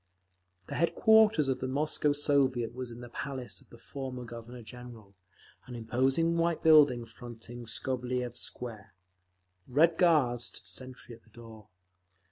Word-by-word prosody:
The -, -, -8 dB
headquarters 215 Hz, -1 st, +4 dB
of 130 Hz, -, 0 dB
the 130 Hz, -, -3 dB
Moscow 150 Hz, +2 st, +1 dB
Soviet 135 Hz, -5 st, +1 dB
was 125 Hz, 0 st, -6 dB
in 120 Hz, +1 st, -9 dB
the 120 Hz, -, -9 dB
palace 130 Hz, -2 st, -5 dB
of -, -, -23 dB
the 120 Hz, -, -14 dB
former 130 Hz, 0 st, -7 dB
Governor 120 Hz, +1 st, -9 dB
General, 120 Hz, -4 st, -12 dB, 0.5 s
an 125 Hz, -, -8 dB
imposing 130 Hz, +8 st, +1 dB
white 170 Hz, -1 st, 0 dB
building 145 Hz, -7 st, +6 dB
fronting 120 Hz, 0 st, -10 dB
Skobeliev 125 Hz, +1 st, -3 dB
Square. 110 Hz, -8 st, -7 dB, 0.7 s
Red 160 Hz, +6 st, +3 dB
Guards 135 Hz, -9 st, +3 dB
stood -, -, -12 dB
sentry 130 Hz, -2 st, -7 dB
at 115 Hz, -, -14 dB
the 115 Hz, -, -26 dB
door. 110 Hz, -2 st, -13 dB
125 Hz, 140 wpm, -30 LUFS, 120-145 Hz, 0.7 s, building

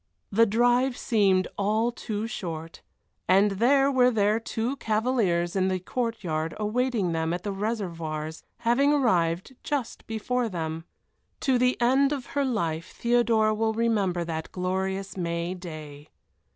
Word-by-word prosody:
The 230 Hz, +3 st, +5 dB
drive 245 Hz, +4 st, +2 dB
seemed 195 Hz, -5 st, +2 dB
all 215 Hz, +4 st, +1 dB
too 220 Hz, -3 st, -4 dB
short, 165 Hz, -7 st, -6 dB, 0.5 s
and 195 Hz, +2 st, +5 dB
there 270 Hz, +7 st, +3 dB
were 250 Hz, -2 st, +5 dB
their 215 Hz, -1 st, +2 dB
two 230 Hz, +3 st, -2 dB
cavaliers 215 Hz, -8 st, 0 dB
in 190 Hz, -1 st, +2 dB
the 185 Hz, -1 st, +1 dB
court 230 Hz, +3 st, -3 dB
yard 160 Hz, -1 st, -2 dB
awaiting 215 Hz, -3 st, 0 dB
them 160 Hz, 0 st, -1 dB
at 175 Hz, -, -7 dB
the 205 Hz, -, -3 dB
Réservoirs, 165 Hz, -7 st, -3 dB, 0.2 s
having 270 Hz, +5 st, +3 dB
arrived 185 Hz, -, +1 dB
just 285 Hz, -6 st, -3 dB
before 235 Hz, +2 st, -1 dB
them. 165 Hz, -3 st, -4 dB, 0.6 s
To 260 Hz, -3 st, +2 dB
the 250 Hz, +1 st, +2 dB
end 265 Hz, +4 st, +3 dB
of 275 Hz, -4 st, -3 dB
her 285 Hz, -, +1 dB
life 170 Hz, -11 st, -2 dB
Theodora 230 Hz, -2 st, +3 dB
will 220 Hz, +1 st, 0 dB
remember 210 Hz, -6 st, +1 dB
that 160 Hz, -1 st, -5 dB
glorious 190 Hz, +1 st, -2 dB
May 170 Hz, 0 st, -2 dB
day. 155 Hz, -5 st, -9 dB
210 Hz, 140 wpm, -26 LUFS, 175-240 Hz, 0.6 s, The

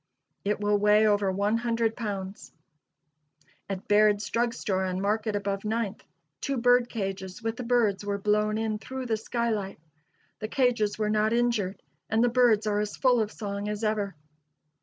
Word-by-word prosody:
It 210 Hz, +1 st, 0 dB
will 205 Hz, 0 st, +2 dB
weigh 210 Hz, +1 st, +5 dB
over 205 Hz, -2 st, +2 dB
one 200 Hz, +4 st, +1 dB
hundred 230 Hz, -1 st, 0 dB
pounds. 200 Hz, -4 st, -5 dB, 1.2 s
At 195 Hz, -1 st, -5 dB
Baird's 210 Hz, 0 st, +4 dB
drug 235 Hz, 0 st, 0 dB
store 190 Hz, -2 st, -1 dB
on 185 Hz, 0 st, -2 dB
Market 210 Hz, +2 st, 0 dB
above 200 Hz, -1 st, -2 dB
Ninth, 220 Hz, -1 st, -2 dB, 0.4 s
two 275 Hz, -2 st, -1 dB
bird 245 Hz, 0 st, +4 dB
cages 195 Hz, 0 st, -5 dB
with 225 Hz, 0 st, -1 dB
the 250 Hz, -, -6 dB
birds 230 Hz, -5 st, +2 dB
were 200 Hz, 0 st, -2 dB
blown 210 Hz, +1 st, +1 dB
in 220 Hz, -1 st, -1 dB
through 260 Hz, +3 st, -6 dB
the 225 Hz, -2 st, 0 dB
skylight. 220 Hz, -5 st, -2 dB, 0.6 s
The 215 Hz, -, -3 dB
cages 235 Hz, -4 st, +1 dB
were 215 Hz, -1 st, 0 dB
not 215 Hz, +1 st, +2 dB
injured, 235 Hz, -6 st, 0 dB, 0.3 s
and 220 Hz, +1 st, +2 dB
the 245 Hz, -, +4 dB
birds 235 Hz, -3 st, +3 dB
are 205 Hz, -1 st, +1 dB
as 210 Hz, 0 st, -3 dB
full 250 Hz, -3 st, +3 dB
of 215 Hz, -1 st, -2 dB
song 205 Hz, -1 st, -4 dB
as 210 Hz, +1 st, -4 dB
ever. 210 Hz, -4 st, -1 dB
215 Hz, 170 wpm, -27 LUFS, 205-230 Hz, 1.2 s, weigh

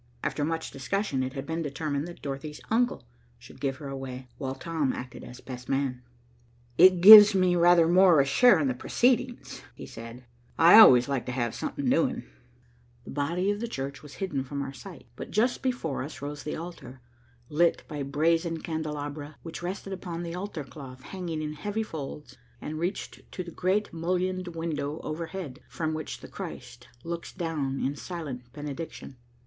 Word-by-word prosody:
After 145 Hz, -, -1 dB
much 165 Hz, +2 st, -2 dB
discussion, 145 Hz, 0 st, -2 dB
it 130 Hz, 0 st, -3 dB
had 135 Hz, -1 st, -5 dB
been 165 Hz, +2 st, -3 dB
determined 145 Hz, 0 st, -3 dB
that 175 Hz, -, -11 dB
Dorothy's 140 Hz, +2 st, -5 dB
uncle 240 Hz, -, +1 dB, 0.3 s
should 120 Hz, +1 st, -15 dB
give 135 Hz, -2 st, -1 dB
her 140 Hz, +1 st, -8 dB
away, 130 Hz, -2 st, -7 dB
while 135 Hz, -2 st, -3 dB
Tom 150 Hz, -1 st, -1 dB
acted 125 Hz, +1 st, -8 dB
as 125 Hz, +1 st, -11 dB
best 125 Hz, -1 st, -9 dB
man. 135 Hz, -2 st, -1 dB, 0.7 s
"It 180 Hz, +3 st, +7 dB
gives 210 Hz, +1 st, +12 dB
me 185 Hz, -1 st, +3 dB
rather 170 Hz, -1 st, +5 dB
more 180 Hz, -2 st, +6 dB
of 135 Hz, -, +4 dB
a -, -, -6 dB
share 195 Hz, -, +6 dB
in 145 Hz, -, +1 dB
the 130 Hz, -, +1 dB
proceedings," 245 Hz, -, 0 dB
he -, -, -9 dB
said, 115 Hz, +2 st, -10 dB, 0.3 s
"I 170 Hz, +6 st, +9 dB
always 125 Hz, -, +8 dB
like 135 Hz, -3 st, -2 dB
to -, -, -2 dB
have 120 Hz, -2 st, -1 dB
something 285 Hz, -2 st, -4 dB
doing." 265 Hz, +1 st, +1 dB, 0.8 s
The -, -, -10 dB
body 170 Hz, +7 st, 0 dB
of 205 Hz, -, -3 dB
the 235 Hz, -, -3 dB
church 140 Hz, -, -5 dB
was 145 Hz, -3 st, -12 dB
hidden 150 Hz, -8 st, -2 dB
from 140 Hz, +1 st, -4 dB
our 135 Hz, 0 st, -6 dB
sight, 125 Hz, -3 st, -11 dB
but -, -, -7 dB
just 230 Hz, +6 st, +1 dB
before 245 Hz, -, -2 dB
us 145 Hz, +4 st, -7 dB
rose 145 Hz, +1 st, -6 dB
the 150 Hz, -, -4 dB
altar, 140 Hz, -7 st, -9 dB, 0.5 s
lit 170 Hz, +4 st, +2 dB
by 150 Hz, -2 st, -5 dB
brazen 165 Hz, +4 st, +1 dB
candelabra 150 Hz, -2 st, -5 dB
which 165 Hz, 0 st, -7 dB
rested 190 Hz, +2 st, -5 dB
upon 175 Hz, -3 st, -5 dB
the 170 Hz, -1 st, -5 dB
altar 180 Hz, -3 st, -5 dB
cloth, 130 Hz, -3 st, -11 dB
hanging 170 Hz, -4 st, -5 dB
in 150 Hz, 0 st, -4 dB
heavy 205 Hz, +8 st, -3 dB
folds, 145 Hz, -, -8 dB, 0.2 s
and 155 Hz, +1 st, -5 dB
reached 180 Hz, +4 st, -5 dB
to 185 Hz, -, -4 dB
the 170 Hz, -, -9 dB
great 190 Hz, +5 st, 0 dB
mullioned 180 Hz, +2 st, -1 dB
window 155 Hz, -2 st, -3 dB
overhead, 165 Hz, -3 st, -5 dB
from 160 Hz, -1 st, -2 dB
which 155 Hz, 0 st, -5 dB
the -, -, -9 dB
Christ 120 Hz, 0 st, -9 dB, 0.2 s
looks 170 Hz, 0 st, -5 dB
down 155 Hz, -7 st, -3 dB
in 140 Hz, +2 st, -1 dB
silent 140 Hz, -8 st, -7 dB
benediction. 145 Hz, -1 st, -7 dB
155 Hz, 180 wpm, -28 LUFS, 135-180 Hz, 0.8 s, gives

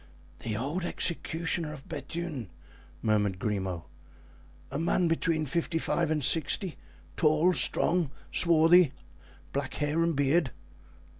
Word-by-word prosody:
"The 110 Hz, -2 st, -3 dB
old 145 Hz, +10 st, -2 dB
executioner 165 Hz, -2 st, -1 dB
of 135 Hz, -3 st, -11 dB
Bethune," 155 Hz, -, -5 dB, 0.5 s
muttered 105 Hz, -3 st, +1 dB
Grimaud; 95 Hz, -5 st, -2 dB, 0.9 s
"a 140 Hz, -, -3 dB
man 170 Hz, +2 st, +2 dB
between 165 Hz, -1 st, +1 dB
fifty 165 Hz, +3 st, -1 dB
five 165 Hz, 0 st, 0 dB
and 155 Hz, -2 st, 0 dB
sixty, 165 Hz, +3 st, +2 dB, 0.4 s
tall, 155 Hz, +4 st, +3 dB
strong, 175 Hz, -2 st, +2 dB, 0.2 s
swarthy, 165 Hz, -2 st, +5 dB, 0.6 s
black -, -, -3 dB
hair 150 Hz, +3 st, 0 dB
and 165 Hz, -1 st, +1 dB
beard?" 145 Hz, +2 st, +2 dB
155 Hz, 115 wpm, -29 LUFS, 135-170 Hz, 0.9 s, swarthy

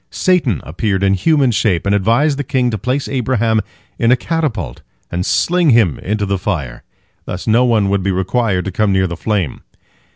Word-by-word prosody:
Satan 165 Hz, -, +1 dB
appeared 95 Hz, -, -2 dB
in 100 Hz, 0 st, +3 dB
human 140 Hz, -, +2 dB
shape, 100 Hz, -6 st, 0 dB
and 100 Hz, -, +1 dB
advised 120 Hz, +9 st, +2 dB
the -, -, -1 dB
king 125 Hz, -2 st, 0 dB
to 110 Hz, -, -2 dB
place 130 Hz, +6 st, -2 dB
Abraham 115 Hz, -4 st, 0 dB, 0.4 s
in 115 Hz, +1 st, +3 dB
a -, -, +6 dB
catapult 155 Hz, -4 st, -3 dB, 0.3 s
and 90 Hz, +1 st, -2 dB
sling 175 Hz, -, +2 dB
him 115 Hz, -, +3 dB
into 105 Hz, +1 st, -2 dB
the 100 Hz, -1 st, -1 dB
fire. 80 Hz, -11 st, -3 dB, 0.4 s
Thus 90 Hz, -, -6 dB
no 115 Hz, +3 st, +3 dB
one 110 Hz, -5 st, +2 dB
would 100 Hz, 0 st, +1 dB
be 95 Hz, -, -1 dB
required 95 Hz, +1 st, 0 dB
to 95 Hz, -, -3 dB
come 105 Hz, +2 st, +1 dB
near 95 Hz, 0 st, +2 dB
the 85 Hz, -2 st, -3 dB
flame. 95 Hz, -4 st, -2 dB
110 Hz, 190 wpm, -16 LUFS, 95-125 Hz, 0.4 s, a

